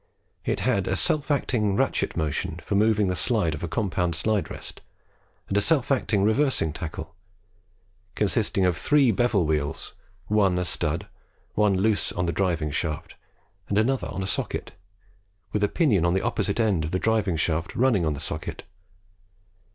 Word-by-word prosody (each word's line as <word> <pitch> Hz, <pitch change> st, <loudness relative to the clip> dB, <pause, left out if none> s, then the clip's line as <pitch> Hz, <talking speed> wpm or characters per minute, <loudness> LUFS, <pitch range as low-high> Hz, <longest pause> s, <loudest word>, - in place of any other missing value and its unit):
It -, -, -1 dB
had -, -, +1 dB
a -, -, +1 dB
self 150 Hz, -1 st, +1 dB
acting 115 Hz, -8 st, +1 dB
ratchet -, -, 0 dB
motion 80 Hz, +2 st, -2 dB
for -, -, -3 dB
moving 105 Hz, 0 st, +3 dB
the 90 Hz, -, 0 dB
slides 100 Hz, -7 st, +1 dB
of 80 Hz, -, -6 dB
a 85 Hz, -, -2 dB
compound 90 Hz, -3 st, -1 dB
slide 100 Hz, -1 st, 0 dB
rest, -, -, -7 dB, 0.7 s
and 100 Hz, -, -2 dB
a 100 Hz, -, +4 dB
self 145 Hz, 0 st, +2 dB
acting 110 Hz, -6 st, +2 dB
reversing 110 Hz, -, +2 dB
tackle, 80 Hz, +1 st, -6 dB, 1.0 s
consisting 100 Hz, -2 st, +1 dB
of 90 Hz, -2 st, +2 dB
three 140 Hz, -, +3 dB
bevel 110 Hz, -4 st, +2 dB
wheels, 75 Hz, -2 st, -2 dB, 0.3 s
one 100 Hz, -4 st, +2 dB
a 90 Hz, -, 0 dB
stud, -, -, -1 dB, 0.5 s
one 105 Hz, -2 st, +3 dB
loose 105 Hz, +2 st, +1 dB
on 90 Hz, -, -1 dB
the 85 Hz, -, -1 dB
driving 85 Hz, -4 st, 0 dB
shaft, 75 Hz, 0 st, -3 dB, 0.5 s
and 100 Hz, -, +1 dB
another 125 Hz, +5 st, +1 dB
on 95 Hz, -, -4 dB
a -, -, -2 dB
socket, 95 Hz, -, -2 dB, 0.8 s
with 105 Hz, -, 0 dB
a 105 Hz, -, +3 dB
pinion 120 Hz, -, +2 dB
on 85 Hz, +1 st, +2 dB
the 95 Hz, -, 0 dB
opposite 100 Hz, +2 st, -1 dB
end 105 Hz, -8 st, +2 dB
of 75 Hz, -, -2 dB
the 90 Hz, -, 0 dB
driving 105 Hz, -4 st, +1 dB
shaft 80 Hz, +1 st, -1 dB
running 120 Hz, -7 st, +3 dB
on 75 Hz, -2 st, 0 dB
the -, -, -7 dB
socket. -, -, -5 dB
100 Hz, 170 wpm, -25 LUFS, 85-110 Hz, 1.0 s, a